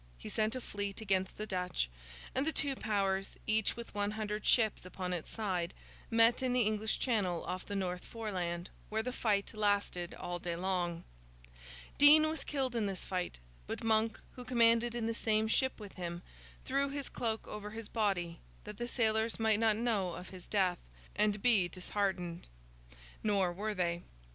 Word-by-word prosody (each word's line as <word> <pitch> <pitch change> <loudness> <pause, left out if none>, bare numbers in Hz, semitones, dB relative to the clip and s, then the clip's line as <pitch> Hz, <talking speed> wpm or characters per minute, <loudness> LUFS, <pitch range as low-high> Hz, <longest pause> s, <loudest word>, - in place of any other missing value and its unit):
He - - -8
sent 215 +2 +1
a 255 - -3
fleet 200 -3 -4
to - - -6
sea - - -4
against 190 -2 0
the 215 - -3
Dutch; 180 - -1 0.5
and 270 +3 0
the - - +3
two 285 -3 +1
powers, 195 -4 0
each 220 -1 +2
with 235 0 -8
one 205 0 0
hundred 210 0 -3
ships 220 -4 +3
upon 185 0 -4
its 170 -3 -4
side, 185 -6 -2 0.3
met 230 +1 +5
in 255 -1 +1
the 250 - +4
English 215 0 0
Channel 195 -9 0
off 185 - -4
the 205 - -3
North 180 -2 -2
Foreland, 180 -6 -4 0.2
where 220 +1 0
the 250 +1 -3
fight 205 -5 0
lasted 205 -4 0
all 175 0 -4
day 170 -1 -3
long. 175 -2 -1 1.0
Dean 305 +2 +10
was 315 +1 -2
killed 265 -4 -1
in 220 -3 +1
this 190 -2 -4
fight; 180 -2 -2 0.3
but - - -4
Monk, 220 0 +2
who 250 - -9
commanded 235 -1 +4
in 235 -2 -1
the 230 - 0
same 220 -1 +2
ship 260 +3 +1
with 205 -2 -9
him, 175 -1 -5 0.4
threw 275 +1 +1
his 280 0 -3
cloak 225 -2 -2
over 210 0 -6
his 220 0 -7
body, 185 -7 0 0.2
that 210 -1 -8
the 240 - -2
sailors 220 -2 +1
might 220 -1 +3
not 225 -2 +4
know 215 -6 0
of 180 - -8
his 185 -2 -10
death, 185 -4 +2 0.4
and 210 -1 +1
be 215 -8 +5
disheartened. 180 -1 -2 0.7
Nor 195 -4 +2
were 210 +3 -2
they. 175 -2 0
210 Hz, 180 wpm, -34 LUFS, 185-225 Hz, 1.0 s, Dean